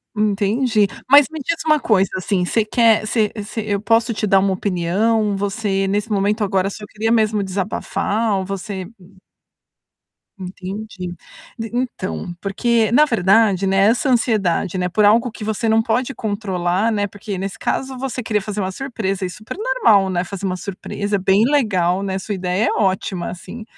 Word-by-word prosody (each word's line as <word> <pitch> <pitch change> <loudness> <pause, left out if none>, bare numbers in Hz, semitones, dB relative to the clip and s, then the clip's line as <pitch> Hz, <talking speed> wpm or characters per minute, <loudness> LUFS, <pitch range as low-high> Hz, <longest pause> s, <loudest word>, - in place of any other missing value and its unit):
Entendi. 210 +2 +1 0.2
Mas 285 +1 +8
me 315 - -6
diz 335 +4 -1
uma 305 -1 +4
coisa, 195 -7 +2
assim, 185 0 0
você 220 +4 +1
quer 225 -1 +3
você 215 -1 +1
você 210 +1 -5
eu 205 -1 -1
posso 230 +2 +2
te 215 - -2
dar 195 -1 +5
uma 190 0 +1
opinião, 200 +4 0
você 195 -1 -1
nesse 205 +3 -1
momento 210 +2 +1
agora 195 -1 +1
só 210 +1 -9
queria 225 +1 -1
mesmo 215 -2 +2
desabafar 200 +2 -1
ou 190 - -3
você 195 -1 -5 1.5
Entendi. 185 0 -7 0.4
D 225 0 -5
então, 225 -7 -3
porque, 225 +2 +1
na 295 +6 +6
verdade, 200 -4 +3
né, 195 0 +1
essa 245 +5 +2
ansiedade, 205 -7 +1
né, 180 0 -1
por 210 +4 +2
algo 230 +4 +4
que 215 - -9
você 220 +1 -1
não 220 0 +4
pode 250 +4 -1
controlar, 200 -2 -1
né, 205 -2 0
porque 205 0 -6
nesse 195 +1 -4
caso 265 -1 -2
você 260 0 -4
queria 215 -3 -1
fazer 210 +1 -5
uma 190 -1 -1
surpresa, 200 -5 -3
é - - -3
super 210 - -9
normal, 430 - +3
né, 180 -1 0
fazer 195 +1 -6
uma 185 -1 -1
surpresa, 200 +2 -4
é - - 0
bem 195 +3 +3
legal, 195 -10 +1
né, 190 -1 -2
sua 205 +2 -4
ideia 180 -1 -2
é - - +1
ótima, 190 -2 -1
assim. 200 +6 -8
205 Hz, 175 wpm, -20 LUFS, 190-225 Hz, 1.5 s, Mas